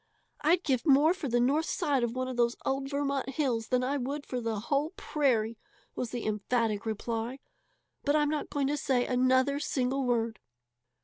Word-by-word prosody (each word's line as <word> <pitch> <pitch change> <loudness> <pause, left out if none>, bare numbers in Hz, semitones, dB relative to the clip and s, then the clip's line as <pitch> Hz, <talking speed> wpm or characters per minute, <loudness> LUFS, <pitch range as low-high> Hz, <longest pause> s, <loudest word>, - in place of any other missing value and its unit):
"I'd 340 +4 +3
give 260 -5 +1
more 300 +2 +5
for 355 -6 -5
the 240 +1 +2
north 285 +7 +2
side 285 -7 +1
of 235 0 -1
one 255 0 -1
of 255 - -4
those 235 0 +2
old 270 0 -1
Vermont 280 -1 -1
hills 250 -5 -1
than 250 0 +1
I 275 +3 0
would 280 +3 -3
for 250 -1 -3
the 225 -2 -2
whole 290 - 0
prairie!" 230 -7 0 0.3
was 245 - -3
the 240 0 -4
emphatic 215 0 0
reply. 225 +3 -3 0.7
"But 285 +1 +2
I'm 295 -1 +3
not 300 -1 -2
going 285 -1 0
to 290 +2 0
say 260 -4 +1
another 260 +2 +2
single 270 -2 0
word." 230 -3 0
260 Hz, 185 wpm, -30 LUFS, 235-285 Hz, 0.7 s, more